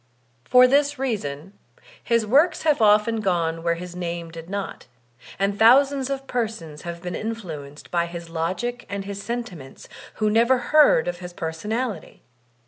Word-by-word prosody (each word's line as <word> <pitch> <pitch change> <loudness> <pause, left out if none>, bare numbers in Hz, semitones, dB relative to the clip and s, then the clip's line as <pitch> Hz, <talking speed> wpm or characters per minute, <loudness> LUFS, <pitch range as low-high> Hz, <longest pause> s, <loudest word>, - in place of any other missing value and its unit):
For 250 0 +7
this 285 +2 +2
reason 195 - -4 0.5
his 230 -2 +1
works 295 +9 +3
have 300 -5 +2
often 215 +1 +4
gone 170 -5 0
where 170 0 +1
his 175 +1 -8
name 170 -2 -5
did 165 +1 -10
not, 200 0 -5 0.5
and 200 +1 -1
thousands 270 +4 +5
of 270 -1 -3
persons 220 - -4
have 170 0 -7
been 180 0 -4
in 225 +1 -3
fluenced 150 -9 -9
by 170 -1 +1
his 170 0 -8
logic 185 +9 -3
and 200 -1 -4
his 200 0 -6
sentiments 200 - -7 0.3
who 215 -1 +1
never 235 +4 +4
heard 285 - +4
of 175 0 -3
hb 180 -1 -9
personality. 210 +7 -4
200 Hz, 155 wpm, -23 LUFS, 170-240 Hz, 0.5 s, For